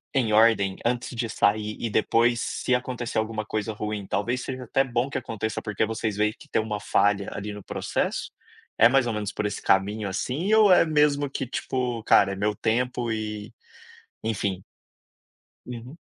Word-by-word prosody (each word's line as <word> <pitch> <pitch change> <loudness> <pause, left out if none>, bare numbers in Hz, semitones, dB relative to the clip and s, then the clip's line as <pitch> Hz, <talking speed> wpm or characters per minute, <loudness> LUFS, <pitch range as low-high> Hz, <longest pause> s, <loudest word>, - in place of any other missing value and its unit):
em 115 -5 +2
ordem 105 -3 +4
antes 120 +1 -1
de 115 -1 -2
sair 105 +1 +1
e 115 - -3
depois 120 +3 +2
se 125 - -1
acontecer 125 -2 -1
alguma 110 -1 -3
coisa 110 0 -2
ruim, 105 -2 -4
talvez 120 +5 -1
seja 130 0 -5
até 135 +3 +2
bom 125 +1 -1
que - - -2
aconteça, 110 -2 -4
porque 105 0 -1
vocês 110 -1 -3
veem 105 0 +2
que - - -15
tem - - +1
uma 105 -1 -2
falha 100 -1 +1
ali 105 +1 -5
no 105 - -9
processo. - - -2 0.5
É 115 - +9
mais 135 0 +3
ou 115 - -1
menos 105 -1 -3
por 105 - -3
esse 105 - -4
caminho, 100 +2 +1
assim, 150 - -2
ou 215 -3 +6
é 170 - +6
mesmo 150 -2 +3
que 135 - -3
tipo, 125 -2 -2
cara, 100 -2 +5
é - - -3
meu 105 +2 0
tempo 120 +2 0
e, 105 0 -4 0.7
enfim. 100 -4 -2 1.0
Uhum. 125 +4 -8
110 Hz, 180 wpm, -25 LUFS, 105-125 Hz, 1.0 s, É